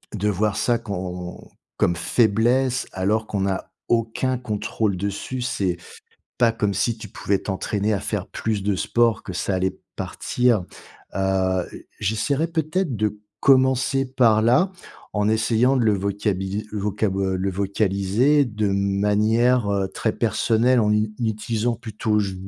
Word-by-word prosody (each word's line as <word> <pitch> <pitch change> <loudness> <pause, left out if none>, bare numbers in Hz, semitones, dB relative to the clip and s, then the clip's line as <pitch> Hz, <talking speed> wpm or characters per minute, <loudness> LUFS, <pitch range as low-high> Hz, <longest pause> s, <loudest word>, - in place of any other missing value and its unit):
de 105 +1 0
voir 105 +1 0
ça, 120 -1 +2
quand 90 -3 -6 0.3
comme 85 - +2
faiblesse 120 +7 +2
alors 105 +4 0
qu'on 100 -2 -1
a 95 0 -4 0.2
aucun 120 +3 0
contrôle 110 -3 -2
dessus. 100 +7 -4
C'est 95 -7 -1 0.6
pas 120 -2 +5
comme 105 -3 -1
si 115 +4 0
tu - - -8
pouvais 100 -1 -1
t'entraîner 100 +2 -2
à 100 - 0
faire 100 -1 -3
plus 110 -3 -2
de 100 0 +1
sport, 115 +1 +1
que - - -7
ça 95 - -1
allait 95 0 -1 0.2
partir, 120 -6 0 0.5
heu, - - -3 0.5
heu, - - -12
j'essaierai 135 - 0
peut-être 160 -2 -1
de 105 0 -1 0.2
commencer 130 0 +3
par 120 -4 +3
là, 130 - +3 0.4
en 105 0 +1
essayant 115 +4 +2
de 125 - +2
le 110 -2 +4
vocabili 100 +1 -2
vocabo 100 -1 -1
heu, 95 -1 0
le 95 +1 -1
vocaliser 100 +8 +2
de 110 -2 -2
manière, 105 +4 +2
heu, 100 -1 +1
très - - -1
personnelle 120 +2 +2
en 105 -1 +2
u 105 0 +1
utilisant 115 +1 -1
plutôt 110 -1 -1
«je», 100 -2 -2
105 Hz, 145 wpm, -23 LUFS, 100-120 Hz, 0.6 s, pas